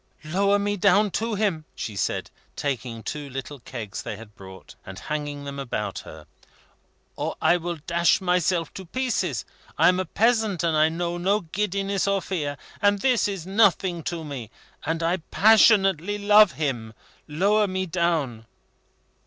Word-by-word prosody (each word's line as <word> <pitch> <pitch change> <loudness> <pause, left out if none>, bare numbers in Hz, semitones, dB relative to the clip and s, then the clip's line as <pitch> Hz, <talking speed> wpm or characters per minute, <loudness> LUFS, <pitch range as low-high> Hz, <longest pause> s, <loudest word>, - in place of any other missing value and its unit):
"Lower 200 +5 +2
me 205 0 -1
down 200 +2 +4
to 225 +2 -1
him," 190 -7 -1
she 105 - -5
said, - - -2 0.2
taking 120 -5 -3
two 145 +4 -5
little 135 +2 -7
kegs 115 -5 -7
they - - -5
had 110 -1 -13
brought, 95 -3 -12
and 95 -1 -9
hanging 145 +2 -4
them 140 0 -6
about 135 -3 -3
her, 80 -1 -11 0.9
"or - - -3
I 175 - +4
will 175 0 -4
dash 170 0 +3
myself 180 -2 0
to 190 - -8
pieces! 190 - -1 0.3
I - - +6
am 180 0 +2
a 185 - -1
peasant, 220 -1 +1
and 165 -2 +1
I 155 +1 +4
know 170 +1 -3
no 200 +4 +1
giddiness 195 +2 -1
or 200 0 +2
fear; 150 -7 -3 0.2
and 205 0 +4
this 250 +1 +2
is 195 -5 -5
nothing 190 -3 +2
to 170 -2 -3
me, 135 -7 -7 0.3
and 165 +2 -2
I 170 +2 +1
passionately 200 -1 +4
love 205 -1 +6
him. 120 -8 -3 0.3
Lower 200 +7 +2
me 190 0 -2
down!" 160 -10 -1
175 Hz, 160 wpm, -25 LUFS, 145-200 Hz, 0.9 s, I